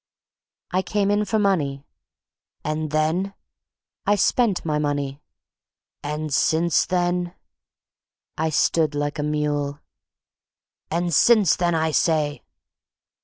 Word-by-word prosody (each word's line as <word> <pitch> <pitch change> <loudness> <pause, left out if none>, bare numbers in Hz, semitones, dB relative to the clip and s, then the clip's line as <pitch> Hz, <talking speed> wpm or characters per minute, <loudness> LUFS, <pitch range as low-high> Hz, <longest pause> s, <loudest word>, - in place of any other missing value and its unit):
"I 185 - +1
came 200 +2 0
in 210 +1 +1
for 220 +2 0
money." 150 -9 0 0.8
"And 155 0 -2
then?" 160 +6 0 0.7
"I 205 - +4
spent 205 -2 +1
my 150 -2 0
money." 145 -1 -2 0.8
"And 150 0 -4
since 160 +2 +2
then?" 175 -1 -1 1.0
I 160 +1 0
stood 155 0 +1
like 145 +1 -2
a - - +1
mule. 150 -1 -1 1.1
"And 170 +1 -1
since 210 0 +5
then, 175 -1 0
I 160 0 +1
say!" 150 -2 +1
160 Hz, 110 wpm, -23 LUFS, 150-180 Hz, 1.1 s, since